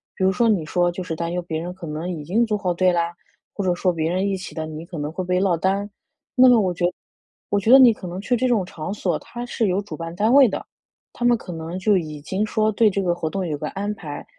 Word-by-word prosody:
比 190 - -3
如 190 - +4
说， 230 +5 +2
你 185 -7 +1
说， 175 +2 +1
就 180 +1 -5
是 165 -2 -4
担 170 +1 -3
忧 180 - -1
别 160 -2 -3
人 175 +2 -5
可 180 -2 -10
能 155 +4 -4
已 160 -5 -5
经 215 +10 +2
组 215 -2 -1
好 180 -3 -1
队 185 +1 +3
啦， 170 -1 0 0.4
或 200 - -3
者 180 - +3
说 180 +1 +1
别 160 0 -1
人 185 +2 0
一 195 - 0
起 185 - -8
的， 160 - -3
你 155 +1 -7
可 170 -1 -8
能 150 +1 -3
会 185 +2 -4
被 180 0 0
落 185 -3 +2
单 190 +4 +1
儿。 200 +1 -3 0.5
那 255 0 +7
么 240 - +6
我 185 -4 +1
觉 175 0 -1
得 175 - 0 0.6
我 205 - +2
觉 220 +4 +1
得 265 - +10
你 245 -4 +8
可 185 - -9
能 175 +2 -5
去 245 +5 +1
这 255 +2 +1
种 225 -7 +2
场 175 +2 -6
所， - - -1
它 240 0 -7
是 230 -3 -1
有 190 +2 +1
主 200 -6 -8
办 165 +2 -6
单 215 +6 +2
位 275 -2 +8
的， - - -4 0.5
他 240 - -6
们 240 -1 +5
可 180 - -9
能 165 +2 -5
就 200 +1 +3
已 155 -4 -5
经 190 +7 -1
说， 215 0 +1
对 215 +1 +4
这 200 0 -1
个 175 -2 +1
活 160 -2 -3
动 190 +2 -3
有 150 -2 -2
个 150 +1 -4
安 205 +2 -3
排。 150 -7 -8
185 Hz, 315 characters per minute, -22 LUFS, 170-210 Hz, 0.6 s, 得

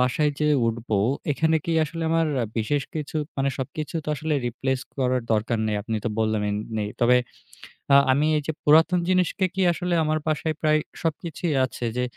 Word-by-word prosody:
বাসায় 145 +4 +2
যেয়ে 150 -1 +3
উঠবো, 115 -1 -1 0.4
এখানে 160 +3 +2
কি 170 - -1
আসলে 165 +2 -5
আমার 165 0 +2 0.3
বিশেষ 140 +6 0
কিছু 155 0 -4 0.2
মানে, 135 0 +1
সবকিছু 145 +4 -5
তো - - -6
আসলে 155 +2 -1
রিপ্লেস 130 +2 -2 0.2
করার 130 -1 +1
দরকার 110 +2 0
নেই। 105 -1 0
আপনি 110 +1 -2
তো - - +1
বললেন 105 -2 0 0.2
নেই। 105 -1 -1
তবে 125 +1 +5 0.8
আ - - +9 0.2
আমি 140 +3 +2
এই - - 0
যে - - +1
পুরাতন 160 +4 +5
জিনিসকে 185 +1 +2
কি 190 - 0
আসলে 180 +1 -2
আমার 155 0 +1
বাসায় 155 0 0
প্রায় 155 -1 +3 0.2
সবকিছুই 165 0 -2
আছে 125 - -6
যে, 125 - +1
150 Hz, 180 wpm, -24 LUFS, 120-160 Hz, 0.8 s, আ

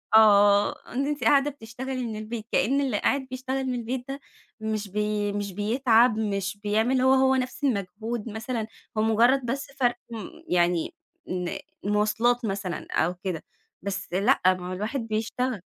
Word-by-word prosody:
آه. 205 -1 +5
إن 270 +3 0
أنتِ 290 -3 -2
قاعدة 280 +5 +4
بتشتغلي 255 0 -5
من 220 -2 -4
البيت، 215 +1 -5
كإن 275 +5 +2
اللي 255 -6 0
قاعد 275 -1 +1
بيشتغل 260 +1 -2
من 255 - -1
البيت 245 +1 -3
ده 275 +1 -5 0.4
مش 215 -1 -2
بي 210 +1 -1
مش 205 -1 -3
بيتعب، 230 +2 +3
مش 200 -2 -1
بيعمل 220 +5 +1
هو، 260 +1 +5
هو 265 0 +4
نفس 255 +2 -3
المجهود 225 -1 -2
مثلًا. 225 +1 -3 0.3
هو - - +3
مُجرّد 235 +4 +4
بس 265 +4 -2
فرق 245 -2 +3 0.2
م 220 -4 -5 0.2
يعني 175 - +1 0.4
إن 180 -1 -2 0.3
المواصلات 220 +4 +2
مثلًا 195 -4 -3
أو 175 +3 +1
كده. 180 -5 -3 0.4
بس 195 -2 -4
لأ، 195 +3 +3
ما 185 -1 +3
هو - - -3
الواحد 210 +9 -2
بيشتغل. 225 +1 -2
220 Hz, 160 wpm, -26 LUFS, 205-255 Hz, 0.4 s, آه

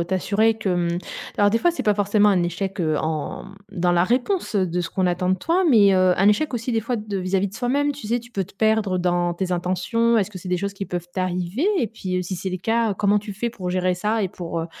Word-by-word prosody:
heu, - - 0
t'assurer 200 +5 +1
que 220 -3 -3
hem, 175 -1 0 0.4
alors 205 0 +4
des 230 - +2
fois 345 +7 +2
c'est 345 - -4
pas 210 - +3
forcément 205 +1 +3
un 185 -4 +3
échec 190 +3 -3
heu, 155 -2 +1
en 155 -2 -3 0.3
dans 180 -2 +1
la 175 0 +3
réponse, 250 - 0
heu, 190 -2 +2
de 175 +1 -1
ce 170 - -3
qu'on 185 +1 0
attend 180 +1 0
de - - +4
toi, 335 - 0
mais, 210 -7 +6
heu, 185 -1 +4
un 195 +2 +4
échec 260 +7 +1
aussi 235 +1 -3
des 230 - +1
fois, 230 +3 -2
de 210 -3 -4
vis-à-vis 190 +1 0
de 195 - -14
soi-même 270 +5 0
tu 285 -5 -7
sais? 240 +3 0
Tu 235 +1 -16
peux 195 -5 -2
te 195 - -20
perdre 215 -3 +1
dans 175 -1 0
tes 185 +1 -3
intentions, 185 +7 +1
est-ce 210 -2 +1
que 195 - -8
c'est 180 - -8
des 180 - +1
choses 200 +2 -3
qui 195 0 -5
peuvent 175 -1 -5
t'arriver? 185 - -1
Et 235 - 0
puis 185 -4 -3
si 180 +1 -4
c'est 190 +2 -4
le 185 - -3
cas, 225 +2 +1
comment 205 +2 +2
tu 205 0 -7
fais 235 +4 -2
pour 185 -5 -6
gérer 185 0 +1
ça? 210 +4 -1
Et 195 - 0
pour 170 -2 -5
heu, 165 - -4
195 Hz, 270 wpm, -22 LUFS, 180-225 Hz, 0.4 s, mais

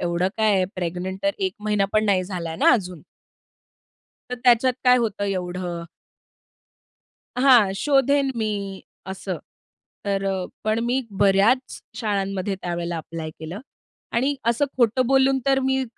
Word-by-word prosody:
एवढं 175 +1 0
काय 220 -1 +3
आहे, 185 -1 +2
प्रेग्नंट 180 +1 -4
तर 295 - +3
1 380 -2 -1
महिना 210 -1 +1
पण 215 0 +3
नाही 195 -3 +2
झालाय 170 -4 -5
ना, - - +5
अजून 180 -8 -2 1.3
तर - - -1
त्याच्यात 245 +1 +5
काय 250 0 +6
होतं 215 -4 -1
एवढं? 180 -2 -3 1.6
हां, 245 -7 +6
शोधेन 275 +4 +2
मी 200 -3 -3 0.3
असं. 190 -2 -5 0.7
तर 195 -1 -1
अ, 190 -2 -1 0.2
पण 215 +1 +1
मी 250 +2 +1 0.2
बऱ्याच 205 +6 +3 0.2
शाळांमध्ये 195 -3 -2
त्यावेळेला 175 -1 -3
ॲप्लाय 160 0 -6
केलं 160 +4 -8 0.6
आणि 265 +5 +1
असं 235 +4 +2
खोटं 245 +1 +2
बोलून 270 +1 +3
तर 270 -1 +4
मी 265 0 +1
200 Hz, 135 wpm, -23 LUFS, 185-250 Hz, 1.6 s, काय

